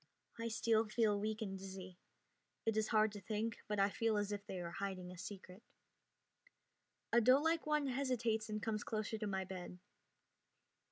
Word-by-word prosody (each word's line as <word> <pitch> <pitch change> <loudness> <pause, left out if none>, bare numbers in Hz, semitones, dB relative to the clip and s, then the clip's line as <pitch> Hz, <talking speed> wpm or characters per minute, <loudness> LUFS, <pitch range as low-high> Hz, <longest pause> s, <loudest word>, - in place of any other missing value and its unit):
I 230 - -1
still 225 -1 +2
feel 215 -2 +2
weak 215 +1 -1
and 195 -2 -4
dizzy. 190 -1 -8 0.7
It 225 -1 +2
is 215 0 +2
hard 215 -1 +4
to 205 -1 -8
think, 220 +3 -2
but 210 - -1
I 200 +1 +4
feel 225 0 +1
as 205 0 0
if 205 -1 -3
they 185 - -4
are 170 -1 -4
hiding 185 -1 -4
a 180 - -9
secret. 190 0 -8 1.5
A 235 - +7
doelike 300 +7 +4
one 300 -1 +3
hesitates 245 -4 0
and 215 -1 -3
comes 215 -2 -1
closer 215 0 -2
to 215 - -1
my 190 -1 -1
bed. 180 -1 -7
215 Hz, 170 wpm, -38 LUFS, 195-225 Hz, 1.5 s, A